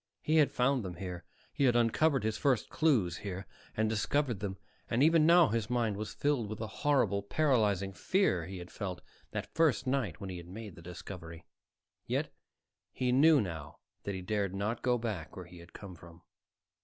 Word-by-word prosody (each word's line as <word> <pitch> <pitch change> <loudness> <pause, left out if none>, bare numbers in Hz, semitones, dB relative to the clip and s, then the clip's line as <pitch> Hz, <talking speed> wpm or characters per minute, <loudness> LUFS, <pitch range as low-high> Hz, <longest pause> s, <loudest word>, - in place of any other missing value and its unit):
He 155 +1 +2
had 150 -2 +5
found 125 0 +1
them 90 -2 -6
here; 90 -1 -6 0.3
he 140 - +1
had 120 -2 +4
uncovered 120 +3 +3
his 110 0 0
first 130 -6 +1
clues 120 - +2
here, 95 -1 -6 0.3
and 110 0 +2
discovered 115 +2 0
them; 95 -2 -4 0.3
and 120 +4 +2
even 160 0 +5
now 170 -3 +7
his 110 0 -1
mind 120 -4 0
was 105 +1 -5
filled 140 -7 0
with 110 - -5
the 110 - -4 0.2
horrible, 135 -9 +2
paralyzing 105 - +1
fear 95 - +1
he 95 0 -7
had 90 0 -9
felt 95 -4 -5 0.3
that - - -5
first 160 -6 +2
night 130 - -1
when 95 -2 -6
he 90 - -6
had 85 -1 -10
made 105 +2 -8
the 85 - -13
discovery. 85 -1 -9 0.6
Yet - - -1 0.6
he 125 -1 -1
knew 150 +4 +6
now 80 -7 -6 0.2
that 100 - -4
he 95 - -6
dared 100 -1 -1
not 105 +4 -2
go 125 -1 +2
back 105 -9 -5
where 90 - -7
he 90 0 -13
had 85 +1 -14
come 100 -3 -10
from. 85 0 -15
105 Hz, 195 wpm, -32 LUFS, 90-130 Hz, 0.6 s, now